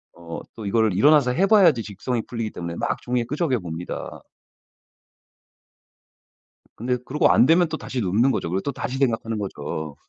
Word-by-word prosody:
어 85 -1 -8 0.2
또 110 - -8
이거를 110 0 +2
일어나서 140 +4 +4
해 185 +9 +2
봐야지 180 - +5
직성이 110 +4 -3
풀리기 115 -3 -4
때문에 85 -1 -6
막 - - -2
종이에 125 -1 -1
끄적여 140 -1 -1
봅니다. 85 0 -7 2.5
근데 125 +2 -1
그러고 150 +3 +2
안 - - +5
되면 170 +3 +4
또 160 - -3
다시 130 -4 -4
눕는 110 +7 +2
거죠. 85 - -2
그리고 95 +2 -1
또 140 - -3
다시 135 -1 -4
생각하는 115 -4 0
거죠. 80 -5 -5
115 Hz, 350 characters per minute, -23 LUFS, 95-135 Hz, 2.5 s, 봐야지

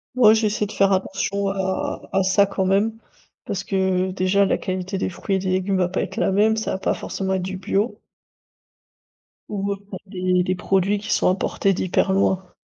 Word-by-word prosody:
Moi, 220 -4 +7
j'essaie 215 -1 +1
de 205 - -8
faire 195 0 +3
attention 195 +1 -1
à 190 -1 -2
à 195 0 +3
ça, 200 +2 +4
quand 195 -1 -1
même, 200 +4 +2 0.5
parce 195 -1 -3
que, 190 -1 0
déjà, 190 +2 +2
la - - +1
qualité 185 +1 -3
des - - -1
fruits 195 +2 -2
et - - +1
des 185 0 -3
légumes 190 +1 0
va 180 -1 +1
pas 185 - -1
être - - -5
la - - +1
même, 215 +3 +3
ça 220 - -2
va - - -1
pas 190 - 0
forcément 190 -1 -3
être 185 - -1
du 190 0 -4
bio. 200 +4 -1 1.5
Ou, 200 -1 -1
heu, - - -7
bah 190 - -4
des 185 -2 0
des 185 - 0
produits 195 +2 +1
qui 215 - -5
sont - - +2
importés 195 +1 +1
d'hyper 185 +1 0
loin. 190 -1 +1
190 Hz, 205 wpm, -22 LUFS, 185-200 Hz, 1.5 s, Moi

